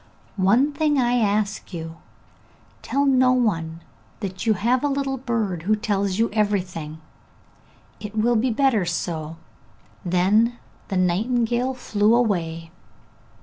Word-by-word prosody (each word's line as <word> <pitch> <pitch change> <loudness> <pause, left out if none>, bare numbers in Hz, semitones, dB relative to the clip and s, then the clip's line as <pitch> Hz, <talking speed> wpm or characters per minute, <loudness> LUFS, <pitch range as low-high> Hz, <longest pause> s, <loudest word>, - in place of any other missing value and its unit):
'One 220 +9 +3
thing 300 -1 +1
I 245 -1 +2
ask 205 -3 -1
you! 165 0 -7 0.8
Tell 280 +1 0
no 255 -2 +4
one 165 -10 -1 0.4
that 190 +1 -5
you 220 - +4
have 240 +7 +1
a - - +2
little 275 -1 -1
bird 225 -9 -2
who 210 +6 +2
tells 200 -3 -1
you 230 +1 +1
everything; 180 -7 -2 1.0
it 210 0 -8
will 235 +3 +2
be 240 +4 +2
better 240 -3 +2
so!' 165 -2 -3 0.7
Then 200 +7 +2 0.3
the 190 - -2
nightingale 235 +7 +1
flew 215 -2 +2
away. 165 -8 -1
215 Hz, 125 wpm, -23 LUFS, 180-245 Hz, 1.0 s, no